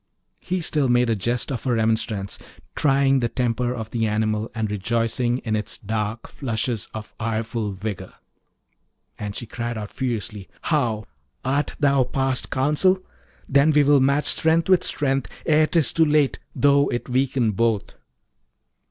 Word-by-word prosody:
He 185 0 -2
still 150 -4 +1
made 120 -1 +3
a - - +2
jest 120 +7 -1
of 130 - -4
her 125 -2 +2
remonstrance, 110 -3 -1 0.4
trying 135 -1 +3
the 120 -2 0
temper 120 0 -1
of 110 -2 -6
the 115 -2 0
animal, 110 +1 0
and 110 -2 -2
rejoicing 115 +4 0
in 110 -2 0
its 105 - -3
dark 110 +1 -3
flushes 115 -3 -2
of 110 -1 -8
ireful 115 -1 -2
vigour. 100 +1 -5 1.1
And 105 -1 -5
she - - -4
cried 120 +1 -4
out 105 -2 -6
furiously, 110 -6 -4
'How! 120 -9 0 0.4
art 140 +3 0
thou 140 -2 +4
past 135 +1 -1
counsel? 150 +8 +2 0.4
then 140 +2 +4
will 145 -1 +5
we - - +3
match 140 +2 +2
strength 165 +2 +3
with 185 -2 +5
strength 135 -3 0 0.2
ere 155 -1 +4
'tis 165 -4 +2
too 165 - +4
late, 150 -2 +2 0.2
though 140 0 +4
it 120 - -3
weaken 130 -2 +1
both.' 110 0 0
120 Hz, 150 wpm, -23 LUFS, 110-140 Hz, 1.1 s, will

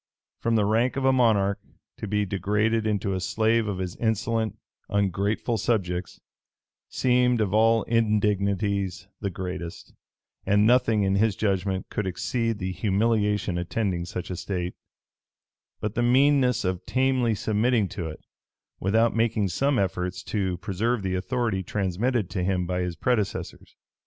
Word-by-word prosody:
From 115 0 +1
the 105 -2 +3
rank 115 +4 +2
of 135 -1 -1
a 135 - +5
monarch, 105 -5 +3 0.4
to 110 - -5
be 105 0 0
degraded 105 +3 0
into 100 -2 0
a 95 - -1
slave 110 +3 +1
of 100 -2 -2
his 90 -1 -4
insolent, 110 0 -1 0.3
ungrateful 100 +3 0
subjects, 90 -6 -1 0.7
seemed 125 -1 +2
of 105 -3 0
all 115 0 +4
indignities 100 -4 0
the 100 - -2
greatest; 90 -2 -6 0.5
and 105 +1 +3
nothing, 115 -3 +3
in 95 0 +2
his 110 -1 +2
judgment, 95 -2 -1
could 105 - -2
exceed 115 +4 -1
the 95 -1 -3
humiliation 105 -2 +1
attending 90 -1 -2
such 90 +1 -5
a - - -2
state, 90 -1 -3 1.1
but 105 -1 -2
the 120 - 0
meanness 130 -1 +3
of 90 -1 -1
tamely 130 -3 +2
submitting 110 +1 +1
to 85 -4 -5
it, 80 - -8 0.6
without 115 +5 +2
making 110 -3 +1
some 135 +7 +1
efforts 90 -2 -2
to 95 -4 -2
preserve 105 +5 -1
the 95 -1 -1
authority 110 +1 -1
transmitted 100 +4 -1
to 90 - -2
him 90 -1 0
by 90 +1 -1
his 90 -1 -3
predecessors. 105 +3 -2
105 Hz, 145 wpm, -26 LUFS, 95-115 Hz, 1.1 s, a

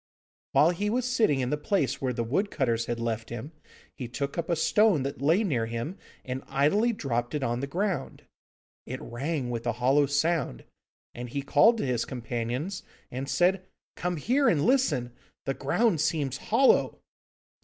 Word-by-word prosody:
While 150 +5 +5
he 205 +4 -1
was 245 +3 0
sitting 220 - +2
in 125 - -1
the 150 - +1
place 150 - 0
where 130 -2 0
the 120 -1 -2
wood 155 - 0
cutters 115 - 0
had 120 0 -2
left 115 -1 -3
him, 120 +6 -6 0.4
he 125 - -5
took 140 +4 -4
up 170 -1 -3
a 170 - +2
stone 200 -2 +3
that 140 0 -5
lay 165 +9 +3
near 125 - 0
him, 115 +10 -4 0.3
and 130 0 -4
idly 200 - +2
dropped 120 - -2
it 145 - -1
on 120 -1 0
the 140 - -3
ground. 185 +5 -2 0.6
It - - -5
rang 135 +1 -3
with 120 0 -4
a 120 - +1
hollow 135 +4 +3
sound, 145 - 0 0.5
and 120 0 -7
he 140 +3 -3
called 215 +12 +5
to - - -1
his 125 -3 0
companions, 125 - -3 0.3
and 135 +2 -4
said, 185 +1 +2 0.3
'Come 180 0 -2
here 265 - +2
and 150 -3 +2
listen; 155 - +2 0.3
the 135 - 0
ground 165 - +1
seems 150 -4 0
hollow! 245 - +3
140 Hz, 175 wpm, -28 LUFS, 125-180 Hz, 0.6 s, While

